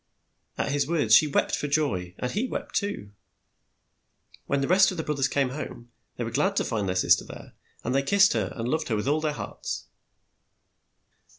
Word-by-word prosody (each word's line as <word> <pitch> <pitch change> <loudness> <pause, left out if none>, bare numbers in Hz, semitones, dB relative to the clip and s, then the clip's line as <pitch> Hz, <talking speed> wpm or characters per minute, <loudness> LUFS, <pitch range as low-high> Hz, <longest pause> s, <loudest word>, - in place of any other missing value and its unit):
At - - -1
his 140 -1 0
words 150 -10 +1
she 150 - +7
wept 140 - +1
for 145 - -3
joy, 100 - -1
and 125 - -3
he 225 +6 -1
wept - - -5
too. 200 - -2 1.4
When 140 - +1
the 135 - 0
rest 190 +2 +5
of 185 - -5
the 160 - -2
broth 150 -2 -3
ers 135 - +3
came 140 -2 0
home, 125 -3 -7 0.3
they 120 - -2
were 115 - -4
glad 190 - +1
to - - +1
find 105 -4 -2
their 90 - -1
sis 90 - +5
ter - - -8
there, - - -11 0.3
and - - -1
they 135 - +3
kissed 195 +7 +4
her, 110 -5 -1
and 115 0 -3
loved 155 +5 -1
her 115 - 0
with 105 +4 -2
all 150 +2 +2
their 155 -1 0
hearts. - - -6
140 Hz, 210 wpm, -26 LUFS, 115-155 Hz, 1.4 s, she